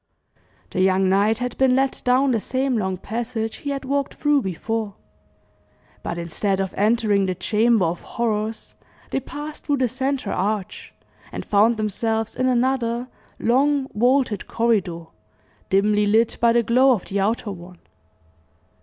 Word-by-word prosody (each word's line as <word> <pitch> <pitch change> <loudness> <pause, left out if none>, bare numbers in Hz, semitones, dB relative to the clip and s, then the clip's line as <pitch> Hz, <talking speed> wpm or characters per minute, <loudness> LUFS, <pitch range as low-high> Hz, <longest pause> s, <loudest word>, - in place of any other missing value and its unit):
The 185 - -1
young 190 0 +3
knight 205 +3 +3
had 250 0 -3
been 260 -1 +4
led 270 0 0
down 255 +2 +3
the 230 - +1
same 260 +4 -1
long 190 -4 -1
passage 225 +2 -4
he 285 - -6
had 275 -1 -3
walked 280 +1 -1
through 295 -1 +2
before; 210 +2 -3 1.1
but 170 - -4
instead 180 +4 -1
of 190 -1 -2
entering 210 -2 +2
the 185 - -1
chamber 215 +2 +2
of 165 +1 -2
horrors, 220 -1 -3 0.4
they - - 0
passed 295 +3 -8
through 290 -2 0
the 255 -1 +2
centre 260 -2 -2
arch, 205 -2 -3 0.4
and - - -6
found 215 +3 +3
themselves 220 +1 -1
in 255 - 0
another 250 -1 0 0.3
long, 275 +3 +2
vaulted 245 -2 +1
corridor, 195 -8 0 0.6
dimly 205 +2 +3
lit 225 +2 +3
by 235 0 +5
the 235 0 +3
glow 255 +4 +4
of 210 - -3
the 200 - -2
outer 210 +1 0
one. 180 -1 -11
225 Hz, 150 wpm, -22 LUFS, 200-255 Hz, 1.1 s, by